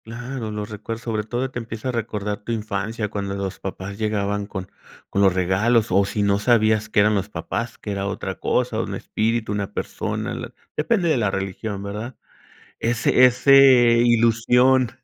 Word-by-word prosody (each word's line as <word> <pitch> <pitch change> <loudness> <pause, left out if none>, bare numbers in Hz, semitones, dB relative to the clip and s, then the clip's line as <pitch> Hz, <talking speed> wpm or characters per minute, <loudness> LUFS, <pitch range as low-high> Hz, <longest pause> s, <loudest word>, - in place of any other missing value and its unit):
Claro, 120 +1 -6
lo 105 -1 -4
recuerdo, 110 +2 -6
sobre 110 -2 -3
todo 125 +4 -3
te 120 - -4
empieza 115 +2 -5
a - - +1
recordar 105 -3 -3
tu 120 - -5
infancia 110 0 -3
cuando 100 -1 -3
los 95 -1 -4
papás 95 +1 -6
llegaban 105 -1 -1
con 95 -3 -6 0.4
con 100 - +1
los 95 -1 +5
regalos 105 +5 +2
o 100 +2 +4
si 105 +1 -2
no 100 0 +2
sabías 110 -1 +2
que 105 - +3
eran 105 +1 +3
los 100 0 -1
papás, 115 +2 -4
que 105 - -6
era 100 0 -2
otra 100 - -4
cosa, - - 0
un - - -4
espíritu, 110 0 -1
una 100 -1 -3
persona, - - -3
la - - -6 0.2
depende 175 +4 +1
de 155 - +3
la 105 -4 +1
religión, 95 +1 -4
¿verdad? 105 +5 -6 0.6
Ese 120 +2 +3
ese 125 +2 +1 0.5
ilusión, 120 +2 +3
110 Hz, 175 wpm, -22 LUFS, 100-120 Hz, 0.6 s, los